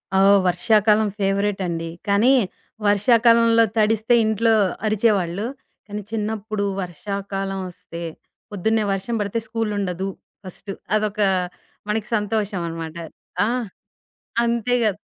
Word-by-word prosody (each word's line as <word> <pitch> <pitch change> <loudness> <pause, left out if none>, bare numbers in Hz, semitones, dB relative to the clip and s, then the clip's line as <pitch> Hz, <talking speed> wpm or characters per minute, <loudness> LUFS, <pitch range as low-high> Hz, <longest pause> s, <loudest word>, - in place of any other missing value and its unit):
ఆ! 190 - +5 0.3
వర్షాకాలం 210 +4 +3
ఫేవరేటండి. 195 -4 -1 0.2
కానీ 215 +7 +4 0.5
వర్షాకాలంలో 230 +2 +5
తడిస్తే 220 +2 +3
ఇంట్లో 225 +1 +2 0.3
అరిచేవాళ్ళు. 205 -3 +1 0.4
కానీ 210 +1 -5
చిన్నప్పుడు 215 -1 -2 0.2
వర్షాకాలం 195 +2 -4
ఒస్తే 170 -1 -10 0.5
పొద్దున్నే 215 +3 +1
వర్షం 195 +5 -3
బడితే 205 +2 -1
స్కూలుండదు. 205 -5 -2 0.4
ఫస్ట్ 190 +2 -8 0.2
అదొక 210 0 0 0.7
మనకి 215 +1 -1
సంతోషమనమాట. 185 -6 -2 0.5
ఆ! - - 0 1.0
అంతేగా 235 0 +1
210 Hz, 90 wpm, -22 LUFS, 195-220 Hz, 1.0 s, ఆ